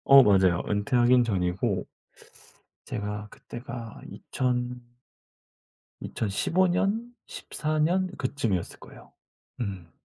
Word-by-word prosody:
어 135 0 +10
맞아요. 95 -5 +4
은퇴하긴 120 +4 +4
전이고 95 -1 0 1.0
제가 105 0 -4
그때가 120 -1 -8
이천 125 -1 -2 1.2
2015 165 - +1
년, 205 +7 0
14 155 0 -3
년 180 +4 +2
그쯤이었을 120 -9 -2
거예요. - - -15 0.5
음. 95 -6 -5
120 Hz, 175 characters per minute, -27 LUFS, 100-145 Hz, 1.2 s, 어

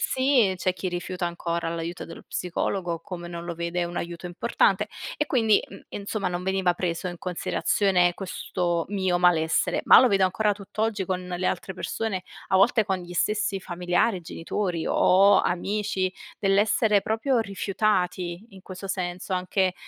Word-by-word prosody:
Sì, 260 -7 +3
c'è 185 +1 0
chi 185 +1 -3
rifiuta 180 0 -3
ancora 170 -1 -3
l'aiuto 170 +1 -5
dello 165 - -10
psicologo 175 -1 -2
come 175 0 -7
non 170 0 -6
lo 170 0 -4
vede 170 +1 -2
un 175 0 -6
aiuto 170 0 -5
importante 175 0 +1 0.3
e 300 - 0
quindi, 225 -7 +3
mhmm, - - -11
insomma 200 -1 -3
non 180 0 -4
veniva 190 -1 +2
preso 175 0 -2
in 175 -1 -7
considerazione 180 0 +1
questo 175 -2 -2
mio 190 -3 +1
malessere. 165 -3 +2
Ma - - +10
lo 255 - +5
vedo 195 -3 +2
ancora 210 +3 +1
tutt'oggi 210 +1 -2
con 185 0 -3
le 180 0 -2
altre 190 - -3
persone, 195 0 -3 0.3
a - - 0
volte 220 +3 +4
con 190 -1 -1
gli 175 -1 -9
stessi 210 +2 0
familiari, 180 +3 0
genitori 170 +1 -3
o 195 +2 +5
amici 190 +1 -1 0.3
dell'essere 205 +1 +3
proprio 230 +3 +1
rifiutati 190 -2 -1
in 195 -2 -13
questo 185 +1 -8
senso 185 -1 -3
anche, 185 0 +1
185 Hz, 155 wpm, -26 LUFS, 175-200 Hz, 0.3 s, Ma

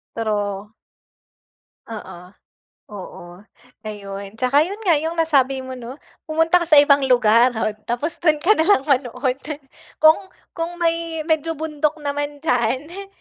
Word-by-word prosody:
Pero 210 -1 -3 1.1
Oo, 185 -5 -10 0.6
oo, 200 -4 -10 0.6
ayon. 200 -2 -7
Tsaka 275 +4 +3
'yun 400 +5 -7
nga 350 -6 +3
'yung 320 +3 -3
nasabi 275 -5 +2
mo 260 0 -7
'no, 250 +3 -9 0.2
pumunta 325 +2 +2
ka - - -12
sa 305 -3 +7
ibang 285 -1 +4
lugar 240 -1 +4
at 220 -2 -2
tapos 265 +8 -3
dun 310 -3 +3
ka 425 +7 +4
nalang 320 -2 +3
manood. 260 -1 0 0.6
Kung 315 0 +6 0.4
kung 345 +1 -4
may 330 -1 -1
medyo 320 0 +1
bundok 305 0 -2
naman 290 0 -4
diyan, 250 -4 +1
eh, 390 +3 -8
285 Hz, 135 wpm, -21 LUFS, 235-320 Hz, 1.1 s, sa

